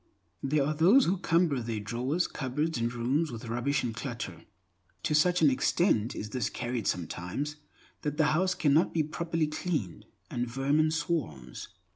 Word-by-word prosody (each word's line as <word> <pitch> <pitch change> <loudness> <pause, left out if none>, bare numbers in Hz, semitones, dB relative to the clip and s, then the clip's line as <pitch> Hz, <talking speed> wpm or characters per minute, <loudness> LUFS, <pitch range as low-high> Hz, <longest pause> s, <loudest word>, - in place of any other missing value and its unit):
There 140 +1 +1
are 150 - 0
those 185 - +6
who 185 +1 +1
cumber 165 -6 +2
their 115 -2 -3
drawers, 125 - -1
cupboards, 140 +3 -2
and 115 0 0
rooms 130 +7 0
with 115 0 -7
rubbish 120 +5 0
and 120 -2 -2
clutter. 115 - -6 0.6
To 155 - 0
such 175 +3 +3
an 145 - +7
extent 130 - +2
is 105 0 -5
this 120 -2 -1
carried 120 -4 -3
sometimes, 90 - -3 0.4
that 150 0 -3
the 155 - +4
house 185 +3 +2
cannot 155 +3 +3
be 160 - +3
properly 165 +1 -1
cleaned, 150 - -3 0.2
and 120 0 -1
vermin 140 +5 +2
swarms. 150 - -3
140 Hz, 160 wpm, -29 LUFS, 115-160 Hz, 0.6 s, an